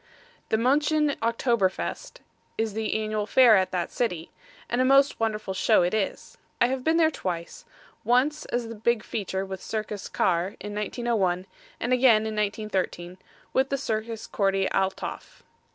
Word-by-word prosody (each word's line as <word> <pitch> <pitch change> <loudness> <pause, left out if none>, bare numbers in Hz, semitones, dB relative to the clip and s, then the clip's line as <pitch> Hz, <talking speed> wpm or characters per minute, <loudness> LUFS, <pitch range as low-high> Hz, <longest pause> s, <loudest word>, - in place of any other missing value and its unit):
The 220 - +2
Muenchen 295 +4 +2
October 230 -3 +2
Fest, - - -6 0.4
is 220 -2 -1
the 220 0 -2
annual 215 -1 -2
fair 245 -3 +6
at 190 -1 +2
that 180 -2 -2
city, 180 -9 -2 0.4
and 240 +2 0
a - - +4
most 275 +2 +4
wonderful 215 -3 -1
show 210 0 +3
it 175 - 0
is. 215 -3 -3 0.2
I 240 - +4
have 260 -1 -2
been 320 +3 +2
there 320 -1 +4
twice; 175 - -5 0.4
once 270 +6 +2
as 240 -1 -2
the 230 - -6
big 230 +1 0
feature 195 -2 -3
with 190 -1 -7
Circus 215 -2 -4
Carre, 180 +3 0
in 205 0 -7
1901, 210 -4 -1 0.3
and 240 +2 0
again 240 -4 +5
in 220 -1 -3
1913, 200 -4 -2 0.3
with 265 +1 +2
the 275 - 0
Circus 225 -3 -3
Corty 195 -1 +1
Althoff. 190 0 -3
220 Hz, 160 wpm, -26 LUFS, 195-245 Hz, 0.4 s, fair